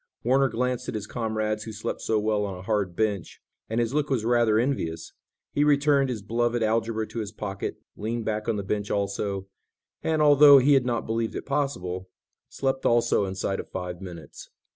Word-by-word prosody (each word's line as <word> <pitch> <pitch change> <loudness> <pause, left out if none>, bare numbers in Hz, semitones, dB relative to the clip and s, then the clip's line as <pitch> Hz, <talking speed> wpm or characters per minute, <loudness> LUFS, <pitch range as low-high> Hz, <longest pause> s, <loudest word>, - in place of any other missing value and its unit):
Warner 135 +2 +3
glanced 125 +2 -2
at - - -4
his 105 -2 -3
comrades 110 -2 -2
who 110 - -6
slept 105 0 -4
so 110 - +1
well 105 0 +1
on 100 -2 -4
a 90 - -10
hard 100 -4 -1
bench, 105 -4 -1 0.3
and 115 +2 0
his 120 +1 0
look 150 0 0
was 125 -5 0
rather 120 -2 +3
envious. 115 -10 -1 0.4
He 145 - +2
returned 145 -2 +3
his 115 -5 -4
beloved 120 +2 0
algebra 110 0 0
to 115 - -5
his 105 -2 -4
pocket, 100 -3 -5 0.2
leaned 115 +2 -3
back 105 +1 -2
on 115 - +1
the 100 - -3
bench 105 +1 -2
also, 100 -1 -2 0.6
and, 160 -1 0
although 145 -1 +8
he 135 +2 +5
had 130 -2 +3
not 120 -2 -1
believed 115 0 -2
it - - -5
possible, 95 -11 -2 0.4
slept 135 -1 -2
also 115 -3 +3
inside 95 0 -2
of - - -7
five 90 -1 -5
minutes. 85 -4 -10
110 Hz, 190 wpm, -26 LUFS, 100-125 Hz, 0.6 s, although